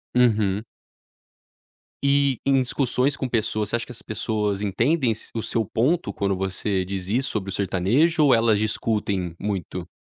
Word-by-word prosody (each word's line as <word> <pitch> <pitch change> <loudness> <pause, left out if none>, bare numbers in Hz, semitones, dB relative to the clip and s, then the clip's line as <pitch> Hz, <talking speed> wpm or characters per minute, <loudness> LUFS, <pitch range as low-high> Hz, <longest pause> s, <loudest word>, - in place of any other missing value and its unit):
Uhum. 110 -5 +3 1.4
E 140 -2 +3
em 135 -1 +4
discussões 130 +2 0
com 130 -2 -3
pessoas. 110 -3 -1
Você - - 0
acha 120 - -2
que - - -11
as 120 - -8
pessoas 105 -2 -2
entendem 120 - +1
esse 110 - -5
o 115 - -2
seu 115 - 0
ponto 135 - 0
quando 100 -1 -1
você 95 0 -1
diz 95 -1 -5
isso 125 +6 0
sobre 100 -2 -3
o - - -4
sertanejo, 115 - +2
ou 135 - +6
elas 115 -2 +4
discutem 105 -5 -1
muito? 95 -3 -4
110 Hz, 160 wpm, -24 LUFS, 100-125 Hz, 1.4 s, ou